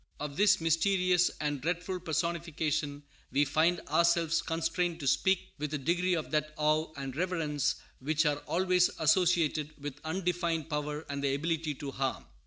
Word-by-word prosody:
Of 145 -1 -5
this 205 +3 +4
mysterious 180 +2 +3
and 145 -3 -2
dreadful 175 +4 -2
personification 160 -3 -2 0.3
we 145 +1 +3
find 160 +5 +2
ourselves 170 -1 +2
constrained 165 +1 -1
to 140 - -3
speak 190 +7 +2
with 150 0 -2
a - - 0
degree 175 +6 +1
of 160 - -4
that 155 0 -1
awe 155 +1 +1
and 135 -2 -5
reverence 155 -5 0 0.2
which 155 +4 +1
are 145 -1 +2
always 180 0 +3
associated 160 -2 +2
with 145 -1 -7
undefined 170 -2 -1
power 150 +1 -3
and 140 0 -4
the 135 -1 +1
ability 160 0 -1
to 140 0 -6
harm. 135 0 -2
160 Hz, 155 wpm, -30 LUFS, 150-175 Hz, 0.3 s, this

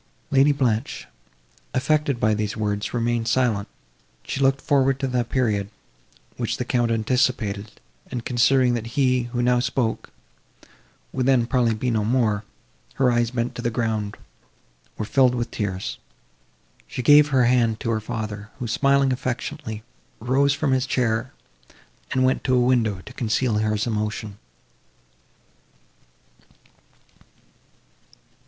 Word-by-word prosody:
Lady 140 +2 +5
Blanche, 125 -3 -1 0.7
affected 145 -1 +1
by 110 -1 +2
these 105 0 -2
words, 105 -1 -2
remained 120 -1 -1
silent; 115 -7 +1 0.6
she - - -4
looked 135 0 +3
forward 135 -1 +2
to 135 - -1
the 125 -2 0
period, 110 -5 -1 0.7
which - - -2
the - - -3
Count 120 -2 +1
anticipated, 110 -3 0 0.3
and 120 -3 -5
considering, 125 0 +3
that 115 -1 -3
he, 130 -3 +2
who 120 0 -1
now 125 0 +3
spoke, 125 -2 -1 1.0
would 130 -1 0
then 130 -3 +4
probably 120 -2 +1
be 125 +3 -1
no 110 -2 +1
more, 110 -2 +1 0.5
her 130 -2 +3
eyes, 120 -1 +1
bent 120 0 -2
to 120 - -6
the 120 - 0
ground, 110 -3 -2 0.8
were 110 - -3
filed 125 +2 +3
with 120 -1 -3
tears. 95 -3 -4 0.9
She 125 - -5
gave 145 +3 +7
her 130 -4 +3
hand 120 -2 +2
to 115 - -1
her 110 -1 -1
father, 110 -2 -5
who, 125 -3 -4
smiling 140 +3 +2
affectionately, 125 -2 -4 0.4
rose 135 +4 +2
from 145 -2 0
his 130 0 +1
chair, 120 -1 0 0.8
and 130 - +1
went 130 0 +1
to 130 - +3
a - - +4
window 120 -6 +2
to 125 - -12
conceal 120 0 0
his 105 -1 0
emotion. 105 -2 -3
120 Hz, 135 wpm, -23 LUFS, 110-130 Hz, 1.0 s, gave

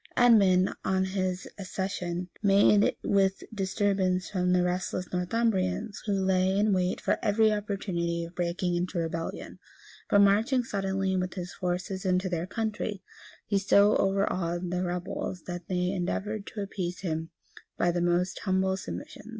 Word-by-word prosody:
{941.} 245 -1 +7 0.3
Edmund, - - -5
on 190 0 +1
his 185 -1 -2
accession, 185 -2 -3
met 200 0 +4
with 195 -1 +2
disturbance 190 -2 0
from 180 -2 +1
the 180 0 +3
restless 180 0 -1
Northumbrians, 190 +1 0
who 205 - +1
lay 190 0 +2
in 210 0 +3
wait 180 -1 0
for - - 0
every 215 +1 +3
opportunity 190 -5 -2
of 170 +1 -8
breaking 175 0 -1
into 180 +1 -2
rebellion. 165 0 -4 0.5
But 205 - +5
marching 220 +6 +3
suddenly 195 -3 -1
with 185 0 -2
his 180 -1 -5
forces 180 +1 -3
into 185 0 +1
their 175 0 -2
country, 215 -2 -3 0.4
he 200 -2 +1
so 200 +1 +5
overawed 185 -3 0
the 180 0 -1
rebels 180 0 -4
that 175 -1 -6
they 180 0 0
endeavored 200 +3 -3
to 210 - -5
appease 185 -3 -4
him 160 -3 -3 0.5
by 175 - +2
the 175 0 -1
most 175 +1 +1
humble 190 0 +1
submissions. 205 +2 -8
190 Hz, 150 wpm, -28 LUFS, 180-200 Hz, 0.5 s, 941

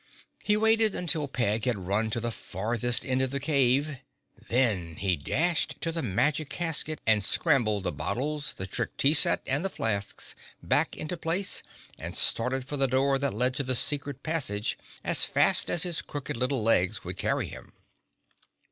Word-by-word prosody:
He 210 0 +2
waited 220 -1 +4
till 150 -1 +2
Peg 115 -4 -1
had 125 -4 0
run 105 +4 0
to 115 - -1
the 120 +1 -3
farthest 115 +4 -1
end 130 0 +1
of 130 - +1
the 140 +1 -2
cave; 140 0 +1 0.5
then 105 -10 +1
he 95 0 0
dashed 160 - 0
to 165 - -1
the 165 0 -2
magic 140 +6 0
casket 155 -2 0
and 110 -2 +4
scrambled 110 - +1
the - - -1
bottles, 145 +2 -3
the 95 - -4
Trick 95 - -4
Tea 140 +2 +4
Set 160 - +4
and 145 +5 0
the 195 - 0
flasks 100 - -3 0.3
back - - +2
into 165 +3 -4
place 175 +4 -2 0.4
and - - -4
started 125 +3 +1
for 145 +2 -5
the 135 -1 +3
door 135 +2 +2
that 140 -5 -1
led 125 +3 +3
to 140 - 0
the 130 -1 0
secret 140 +1 -3
passage 130 -11 -1 0.3
as - - +4
fast - - +4
as 170 - +2
his 170 -5 -2
crooked 145 0 -6
little 125 0 0
legs 95 -5 +1
would - - -6
carry - - 0
him. - - -12
130 Hz, 175 wpm, -27 LUFS, 115-150 Hz, 0.5 s, waited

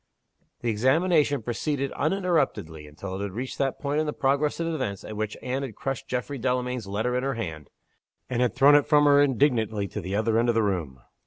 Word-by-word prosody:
The 120 - -1
examination 145 - +2
proceeded 135 +4 -2
uninterruptedly 145 - -1
until 95 +6 -8
it 95 - -4
had 100 -2 -4
reached 125 +5 -5
that 135 -1 0
point 145 +1 -1
in 155 - 0
the 150 - -2
progress 140 +3 0
of 165 - -1
events 130 - -3
at 110 - -7
which 110 0 -3
Anne 130 +2 -2
had 130 -7 -6
crushed 135 +1 -4
Geoffrey 130 +2 -3
Delamayn's 125 -2 -1
letter 110 +5 -1
in 125 - +1
her 135 0 -1
hand, 80 - -6 0.6
and 125 -1 -1
had 120 -3 +1
thrown 140 +2 +6
it 145 -1 +5
from 150 -1 +5
her 145 0 +6
indignantly 120 -7 +1
to - - -5
the 95 +3 -4
other 110 +1 +2
end 120 +1 +2
of 120 - +2
the 115 - +3
room. 80 -11 -2
125 Hz, 215 wpm, -26 LUFS, 105-145 Hz, 0.6 s, thrown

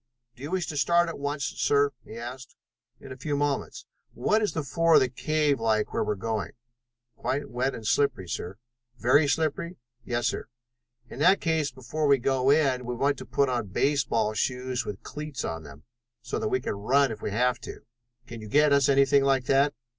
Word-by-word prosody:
"Do 125 - -17
you 145 - -5
wish 185 -1 -1
to 150 - -5
start 170 +4 +3
at 165 - -7
once, 145 0 -3
sir?" 145 0 +1
he 110 - -10
asked. 125 +2 -8 0.4
"In - - -11
a - - -6
few 145 +2 -2
moments. 145 -1 -2 0.3
What 210 - +2
is 210 - 0
the 160 - -2
floor 165 +4 +3
of - - +9
the 130 - +1
cave 150 +2 0
like 110 -1 0
where - - +1
we - - 0
are - - -7
going?" 110 +1 -3 0.6
"Quite 130 +5 -3
wet 130 +2 -1
and 110 - -9
slimy, 125 -5 +1
sir." 90 +2 -5 0.4
"Very 140 +5 +4
slippery?" 165 +4 -1 0.3
"Yes, 120 -1 -2
sir." - - -2 0.6
"In 120 - -10
that 185 +6 +5
case 160 -3 0
before 130 +4 -3
we 140 -1 +5
go 130 +1 +1
in 140 -4 +3
we 125 0 -4
want 140 +3 0
to - - -9
put 140 - +1
on 120 -4 -1
baseball 115 0 +1
shoes 125 +2 -2
with 105 -1 -6
cleats 150 -2 -6
on 80 0 -4
them, 70 -1 -13 0.4
so - - -3
that - - -1
we 130 - +1
can - - -3
run 130 +7 +2
if 110 - -7
we - - -3
have 125 +3 +1
to. - - -9 0.4
Can 115 -1 -9
you 110 - -8
get 150 +5 +4
us 140 -1 +4
anything 140 0 +4
like 135 -2 +2
that?" 140 +2 +3
135 Hz, 205 wpm, -27 LUFS, 120-145 Hz, 0.6 s, of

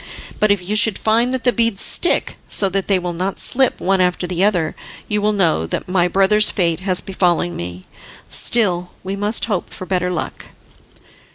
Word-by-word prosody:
But 215 - +3
if 195 -3 0
you 210 - -1
should 210 -1 +4
find 230 +3 +1
that 260 -2 -3
the 245 - +2
beads 230 -4 +1
stick, 350 - +1
so 195 - +3
that 195 0 -2
they 195 - +3
will 175 -1 -3
not 185 +3 -3
slip 265 0 +1
one 190 0 +1
after 180 0 +1
the 180 +1 -1
other, 175 -7 +1 0.3
you 210 -1 0
will 210 +1 +2
know 165 - +1
that - - -4
my 180 -1 +2
brother's 195 +3 +3
fate 170 -4 0
has 185 -1 +1
befallen 175 -2 0
me. 90 +1 -7 0.4
Still, 180 -7 0
we 190 +1 -4
must 205 +3 0
hope 205 -6 -3
for 185 - -8
better 180 -1 -1
luck." 180 - -5
190 Hz, 190 wpm, -18 LUFS, 180-210 Hz, 0.4 s, should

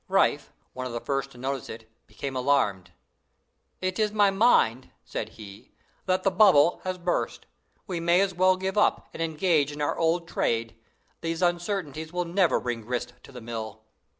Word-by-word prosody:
Riffe, - - +2 0.2
one 130 0 -4
of 120 - -7
the 120 - -2
first 135 +1 -2
to 125 - -16
notice 135 0 -4
it, 110 0 -9 0.2
became 135 -1 -6
alarmed. 105 -9 +1 0.9
"It 185 +1 -2
is 215 -1 +2
my 205 -2 +4
mind," 195 - +3 0.2
said - - -4
he, 100 -2 -12 0.3
"that 185 0 +1
the 195 - +3
bubble 180 -5 +5
has 185 0 -3
burst. 175 0 -2 0.4
We 180 -3 -3
may 170 +2 +3
as 195 -1 +1
well 185 +1 +3
give 190 +2 -1
up, - - +1
and - - -6
engage 160 -2 +1
in 145 - -8
our 145 - 0
old 165 +1 +1
trade. 115 -7 -1 0.5
These 165 +2 -2
uncertainties 175 -3 -1
will 180 0 -1
never 175 +1 +2
bring 120 -2 -3
grist 125 +2 -4
to - - -15
the 125 -2 -10
mill." 110 -1 -6
160 Hz, 180 wpm, -26 LUFS, 125-185 Hz, 0.9 s, bubble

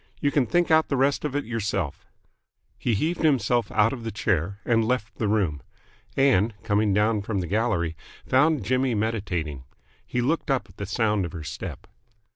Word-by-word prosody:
You 145 - +1
can 140 -5 +2
think 175 +7 +2
out 160 0 +5
the 140 - 0
rest 135 +2 +2
of 145 -2 -3
it 145 - -1
yourself." 100 -8 -3 0.7
He 120 - +1
heaved 160 - -1
himself 120 -7 +2
out 110 +2 +3
of 120 -3 -7
the 115 - -3
chair, 100 -1 -1
and 115 -2 +3
left 115 -1 -1
the 110 - +1
room. 95 -9 0 0.6
Ann, 120 -6 +4
coming 105 -1 +2
down 105 +2 +2
from 100 -1 -2
the 90 - -2
gallery, 90 -4 0 0.3
found 135 -3 +3
Jimmy 130 0 +1
meditating. 90 - -2 0.4
He 125 - -3
looked 145 +7 0
up 130 -7 +1
at 90 - -20
the 100 - -5
sound 105 0 +1
of 85 - -5
her 80 -3 -6
step. 75 - -7
110 Hz, 185 wpm, -25 LUFS, 100-130 Hz, 0.7 s, out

